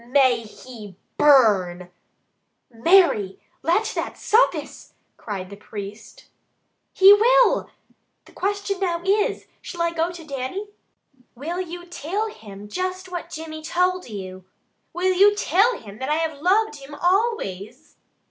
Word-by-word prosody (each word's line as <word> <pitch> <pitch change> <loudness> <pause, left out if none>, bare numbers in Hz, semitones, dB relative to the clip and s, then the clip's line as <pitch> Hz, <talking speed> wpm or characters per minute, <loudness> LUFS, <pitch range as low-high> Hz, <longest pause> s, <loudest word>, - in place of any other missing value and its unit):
May 260 -2 +3
he 215 -3 -12 0.2
burn 190 -11 +4 0.4
" - - -47
"Mary! 330 - +4 0.2
Let 340 +8 +2
that - - -4
suffice!" 455 +4 0 0.2
cried 195 -3 -7
the - - -8
priest. 210 - -10 0.7
"He 385 +1 +8
will! - - +4 0.6
The - - -18
question 400 0 -2
now 345 -3 -1
is, 405 +2 +1 0.2
shall 345 -2 -4
I 340 - 0
go 335 0 -1
to 345 -2 -10
Dannie?" 280 +9 -5 0.7
"Will 330 +8 -4
you 350 0 -8
till 360 +6 -3
him 205 - -12
just 370 - -4
what 345 -1 -5
Jimmy 315 -1 -7
told 360 0 -1
you? 190 -3 -8 0.5
Will 370 +1 0
you 405 +3 +5
till 410 - +2
him 210 -1 -12
that 260 +2 -4
I 300 - +2
have 315 -3 -3
loved 390 0 +2
him 280 +1 -11
always?" 310 - -2
330 Hz, 135 wpm, -23 LUFS, 225-375 Hz, 0.7 s, He